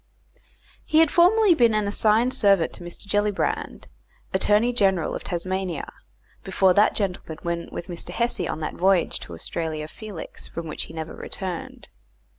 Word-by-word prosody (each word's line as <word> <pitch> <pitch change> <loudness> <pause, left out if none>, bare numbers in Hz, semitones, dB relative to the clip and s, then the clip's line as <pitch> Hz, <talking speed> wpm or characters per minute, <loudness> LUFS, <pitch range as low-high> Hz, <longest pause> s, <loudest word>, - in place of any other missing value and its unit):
He 310 - 0
had 320 -2 +6
formerly 385 +3 +5
been 235 -7 +4
an 210 -1 +1
assigned 220 +4 +2
servant 195 -5 +3
to - - -8
Mr. 175 +3 -8
Gellibrand, 205 0 -1 0.5
Attorney 210 +5 +3
General 190 -7 +2
of - - -5
Tasmania, 185 -2 -3 0.5
before 190 -1 +3
that 205 +3 +4
gentleman 180 -5 -3
went 170 0 -3
with 170 - -6
Mr. 175 -2 -7
Hesse 235 +1 -1
on 155 - -4
that 155 - -3
voyage 185 -1 +2
to 85 - -9
Australia 155 - -4
Felix 205 0 -9
from 170 -1 -6
which - - -4
he - - -12
never 160 0 -5
returned. 185 -4 -6
190 Hz, 155 wpm, -24 LUFS, 170-215 Hz, 0.5 s, had